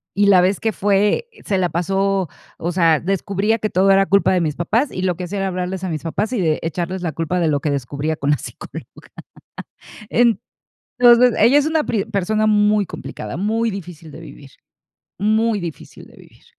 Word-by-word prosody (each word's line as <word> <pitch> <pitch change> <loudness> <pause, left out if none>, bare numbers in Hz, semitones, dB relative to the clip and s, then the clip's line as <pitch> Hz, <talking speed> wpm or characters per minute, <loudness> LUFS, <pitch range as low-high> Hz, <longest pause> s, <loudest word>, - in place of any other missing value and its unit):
y 200 +1 +3
la 190 -3 +6
vez 185 +2 +1
que 220 -1 0
fue, 205 - +1
eh, 455 - -19
se 195 - 0
la 180 -1 +1
pasó 195 +1 0 0.3
o 170 +2 -3
sea, 165 -3 +3
descubría 195 +3 -1
que 215 - -2
todo 195 +1 +3
era 195 0 +4
culpa 200 +1 +3
de 185 -1 +2
mis 155 -3 -1
papás 230 - 0
y 185 - -5
lo 185 -1 0
que 180 - -5
hacía 200 +3 -4
era 195 - -1
hablarles 185 0 -4
a 185 - -2
mis 155 -3 -4
papás 200 +7 -2
y 240 - -1
de 160 -4 +1
echarles 175 +3 -3
la 170 -3 -2
culpa 165 +4 -2
de 170 - +1
lo 145 -2 +1
que 145 +1 -2
descubría 140 +3 -3
con 140 -1 -3
la 145 - +2
psicóloga. - - -9 1.2
En 235 -1 +3 0.6
entonces 240 0 +6
ella 240 +6 +5
es 290 - +3
una 315 -1 +1
pri 215 -4 -1
persona 215 +1 -1
muy 210 -1 +3
complicada, 110 -6 -8
muy 220 +5 0
difícil 170 -5 -9
de - - -11
vivir. 140 -3 -13 0.7
Muy 215 +1 +1
difícil 170 -3 -9
de - - -19
vivir. - - -19
190 Hz, 205 wpm, -19 LUFS, 170-215 Hz, 1.2 s, la